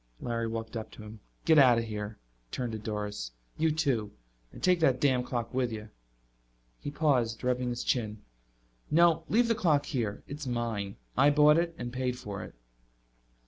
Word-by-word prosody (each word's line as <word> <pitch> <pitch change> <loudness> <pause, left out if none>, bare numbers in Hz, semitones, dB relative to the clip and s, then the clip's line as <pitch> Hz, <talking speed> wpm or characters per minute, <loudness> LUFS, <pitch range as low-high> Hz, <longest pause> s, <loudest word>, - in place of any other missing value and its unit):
Larry 115 -1 -2
walked 115 0 -5
up 110 -1 -4
to 110 - -10
him. 105 +1 -10 0.3
"Get 160 -2 +6
out 125 -4 +7
of 115 - +1
here." 105 -1 -5 0.3
He - - -7
turned 125 -2 -2
to 110 - -4
Doris. 105 - -4 0.3
"You 160 +1 +3
too. 135 -9 0 0.4
And - - -12
take 180 -1 +4
that 135 -6 +3
damn 130 -3 +3
clock 120 -1 -3
with 125 -2 0
you." 110 -1 -6 0.9
He - - -5
paused, 130 -7 +1
rubbing 125 0 0
his 120 0 -3
chin. 110 -4 -1 0.7
"No. 165 0 +4
Leave 235 +2 +4
the 230 - +3
clock 155 -9 +2
here. 115 -8 -2
It's 145 0 -7
mine; 115 -5 -2 0.2
I 145 - +6
bought 150 +2 +6
it 170 -1 -1
and 120 0 -5
paid 125 -1 -1
for 100 -5 -6
it." - - -11
125 Hz, 185 wpm, -30 LUFS, 110-145 Hz, 0.9 s, out